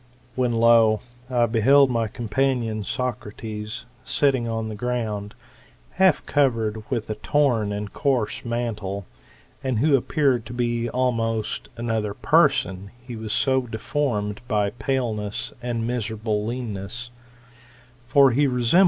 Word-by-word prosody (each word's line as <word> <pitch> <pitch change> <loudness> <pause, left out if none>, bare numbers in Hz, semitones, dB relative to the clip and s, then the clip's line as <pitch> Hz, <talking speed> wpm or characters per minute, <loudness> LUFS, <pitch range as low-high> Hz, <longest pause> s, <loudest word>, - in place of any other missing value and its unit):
When, 125 -2 0
lo 115 -2 +5 0.3
I 120 -2 +2
I - - +6
beheld 130 +5 +5
my 115 -2 +1
companion 115 -1 -1
Socrates, 110 0 -4 0.2
sitting 130 -3 +1
on 115 -1 -2
the 110 - -5
ground, 105 -3 -3 0.6
half 190 -4 +3
covered 115 -6 +1
with 120 -5 -2
a - - -2
torn 120 -8 +1
and 100 0 -4
coarse 125 -5 0
mantle, 105 -5 -3 0.6
and 130 -3 0
who 140 +5 +4
appeared 135 -2 +1
to - - -7
be 120 -1 -1
almost 115 -3 -1
another 110 -3 -1
person, 135 - +2
he 125 0 -9
was 110 -1 -5
so 130 +3 +2
deformed 110 -2 -2
by 105 -2 +1
paleness 110 -3 -2
and 120 -2 -2
miserable 110 -3 -2
leanness; 120 0 -5 0.9
for 135 +2 +5
he 140 +4 +3
resembled 125 -2 -1
one - - 0
of 120 - -1
* - - +2
6 - - +2
I. 175 - +7
115 Hz, 145 wpm, -24 LUFS, 110-125 Hz, 0.9 s, I